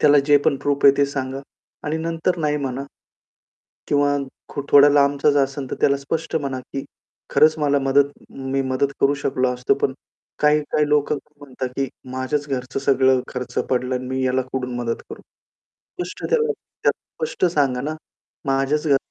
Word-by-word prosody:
त्याला 145 -1 +6
जे 145 - +7
पण 140 - +3
प्रूफ 140 0 -1
आहे 140 0 +8
ते 140 0 +3
सांगा 135 -1 -4 0.5
आणि 155 +2 0
नंतर 165 +2 -1
नाही 150 -1 +1
म्हणा. 135 -1 -3 1.0
किंवा 145 0 +2 0.3
खो - - -4
थोडा 145 0 +8
लांबचा 140 0 +3
जर 140 -1 +4
असेल, 135 -1 -5
तर - - -1
त्याला 140 0 +4
स्पष्ट 160 +4 -3
म्हणा 140 -4 -1
की, 135 +2 -6 0.5
"खरंच 155 +1 +4
मला 145 -1 +2
मदत 140 +1 +3 0.2
मी 135 0 -2
मदत 135 +1 0
करू 140 +1 +4
शकलो 130 -1 +1
असतो, 125 +1 +1
पण 135 - 0 0.5
काही-काही 150 0 +2
लोक 150 0 +2
म्हणतात, 145 -3 -7
की 135 -1 0 0.2
माझ्याच 130 +3 -2
घरचं 130 0 -3
सगळं 130 -1 +3
खर्च 125 -1 -6
पडलं 125 0 0
आणि 125 0 -4
मी 130 0 -2
याला 130 0 +2
कुठून 125 -2 -3
मदत 120 -1 -2
करू?" - - -9 0.8
स्पष्ट 175 - -9
त्याला 455 -1 +2 0.3
त्याला - - +5 0.3
स्पष्ट 460 - -3
सांगा 135 -5 +1
ना, 150 +3 -3 0.5
"माझ्याच 135 +3 +1
घर 140 -2 +5
140 Hz, 170 wpm, -22 LUFS, 130-145 Hz, 1.0 s, आहे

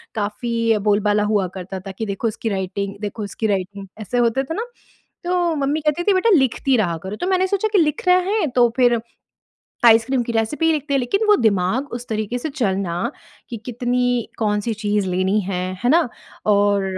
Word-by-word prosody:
काफ़ी 230 +1 0
बोलबाला 210 0 +2
हुआ 195 -3 +2
करता 190 +1 -6
था - - -4
कि, 220 +4 -5
"देखो, 200 +3 -2
उसकी 225 +1 -3
राइटिंग 195 +1 -3
देखो 210 +1 -4
उसकी 210 +2 -3
राइटिंग।" 195 0 -3
ऐसे 245 +4 -3
होते 240 +3 +2
थे 325 - -5
ना? 450 +3 -3 0.6
तो 350 -2 +1
मम्मी 300 +3 0
कहती 300 +3 0
थी, 405 - +3
"बेटा, 380 +5 +2
लिखती 265 0 +1
रहा 170 -6 0
करो।" 195 +2 -5
तो 360 - -1
मैंने 375 0 +2
सोचा 400 +3 0
कि 405 - +5
लिख 305 +2 0
रहें 365 +2 +3
है, 325 - +1
तो 245 -2 +3
फिर 240 -2 +3 0.9
आइसक्रीम 235 +3 +5
की 235 - -4
रेसिपी 230 +9 0
ही 325 - +4
लिखते 295 -2 -2
हैं, - - +3
लेकिन 395 - 0
वो 420 - +7
दिमाग 215 +5 +1
उस 240 0 -6
तरीके 220 +2 -2
से 280 - -4
चलना 195 - -1 0.6
कि 235 - -4
कितनी 245 0 0
कौन-सी 210 +1 0
चीज़ 205 -2 -1
लेनी 190 +3 +1
है, 180 -1 -3 0.2
है 245 - +4
ना? 330 -4 +4 0.4
और 200 -1 +3
230 Hz, 195 wpm, -21 LUFS, 205-280 Hz, 0.9 s, वो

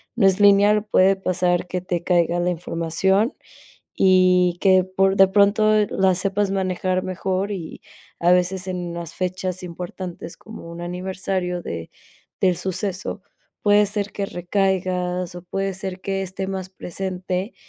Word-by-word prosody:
no 220 - +3
es 190 +1 +2
lineal. 205 +1 +5
Puede 195 -2 +4
pasar 180 -1 0
que 180 0 -3
te 175 -1 -3
caiga 175 -1 +2
la 175 +1 +1
información 175 - 0 0.6
y 180 -2 +4
que 185 -2 +5
por 190 +1 +1
de 195 0 +6
pronto 210 +2 +4 0.2
la 190 -1 +2
sepas 195 +2 0
manejar 185 -1 -1
mejor 185 +2 -2
y, 175 -5 -7 0.4
a 175 +1 +4
veces, 180 +1 +1
en 175 -2 -4
las 170 -1 -7
fechas 185 0 -3
importantes, 175 -1 -7
como 220 -6 -11
un 170 +1 -8
aniversario 180 0 -3
de 85 -1 -6 0.5
del 180 -2 +3
suceso. 190 0 -3 0.4
Puede 205 0 +5
ser 205 0 -3
que 200 - -3
recaigas 180 -1 -1
o 175 - -7
puede 195 +2 -3
ser 190 0 -5
que 195 -1 -2
esté 190 +1 -4
más 190 -1 -4
presente 185 +2 -4
185 Hz, 145 wpm, -22 LUFS, 180-195 Hz, 0.6 s, de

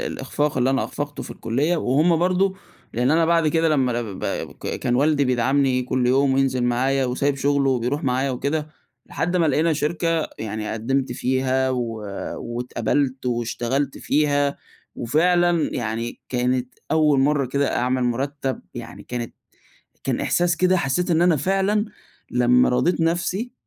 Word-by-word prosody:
الإخفاق 145 -3 -2
اللي 125 +2 +2
أنا 135 - +1
أخفقته 145 0 -5
في - - -9
الكلية، 145 +10 0
وهم 155 +5 +2
برضه 185 +3 +1 0.4
لإن 125 +3 +1
أنا 165 +1 +3
بعد 165 -2 +3
كده 165 +1 +2
لما 135 -5 +2
أنا 120 0 -1
بابقى 100 -4 -4
ب - - -15
كان 120 - -3
والدي 145 +1 +3
بيدعمني 130 +1 +2
كل 125 0 0
يوم، 135 +1 +3
وينزل 130 -2 +1
معايا، 130 +3 +1
وسايب 135 +3 0
شُغله، 140 0 +2
وبيروح 130 +5 -1
معايا 130 +1 +1
وكده، 150 +4 -2 0.4
لحد 175 +2 -2
ما 165 -2 +3
لقينا 160 +3 +2
شركة 165 +1 0
يعني 110 -1 -4
قدّمت 130 +5 -1
فيها، 130 0 0
و 120 -3 -2 0.4
واتقبلت، 125 +2 -2
واشتغلت 120 +3 -1
فيها. 145 -1 +1 0.4
وفعلًا 175 +5 +2
يعني 115 0 -3
كانت 125 0 -1 0.2
أول 150 -3 +3
مرة 140 -1 +2
كده 140 +2 0
أعمل 125 0 0
مرتب 135 +2 -2
يعني 120 -1 -8
كانت 120 -2 -5 0.7
كان - - -1
إحساس 175 -1 +1
كده 185 0 +3
حسّيت 175 +4 0
إن 165 +1 +3
أنا 175 -3 +4
فعلًا 195 +7 +1 0.5
لما 125 0 +4
رَضيت 170 +8 +1
نفسي، 175 +8 -1
135 Hz, 150 wpm, -22 LUFS, 125-160 Hz, 0.7 s, أنا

